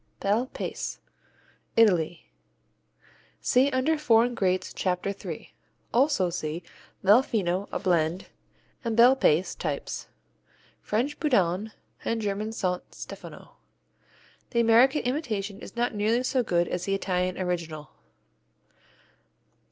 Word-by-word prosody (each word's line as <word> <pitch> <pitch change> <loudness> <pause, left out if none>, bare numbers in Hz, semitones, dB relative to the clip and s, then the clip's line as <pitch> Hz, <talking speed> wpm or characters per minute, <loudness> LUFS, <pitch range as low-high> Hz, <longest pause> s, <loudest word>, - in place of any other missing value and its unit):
Bel 215 +6 +1
Paese - - -5 0.8
Italy 175 -7 +3 1.1
See 260 +2 +3
under 285 +4 +1
Foreign 245 -4 +4
Greats, 185 -4 0
Chapter 185 +1 -1
3. 200 - -8 0.4
Also 245 - +3
see 165 0 -4 0.4
Mel 205 +6 +7
Fino, 195 -6 -1
a - - -1
blend, 175 -2 +1 0.6
and 230 -2 -2
Bel 245 +3 +7
Paese 180 - +2
types 145 -4 -4 0.7
French 260 +8 -1
Boudanne 205 - +1 0.3
and 230 - -1
German 210 +1 -2
Saint 185 -5 -3
Stefano. - - -10 0.9
The 235 - 0
American 235 +5 +5
imitation 220 -7 -2
is - - -11
not 240 0 0
nearly 220 +4 +1
so 255 0 +1
good 175 -6 +1
as 180 - -3
the 195 - +1
Italian 185 -2 -1
original. 165 -5 -3
205 Hz, 115 wpm, -27 LUFS, 180-240 Hz, 1.1 s, Mel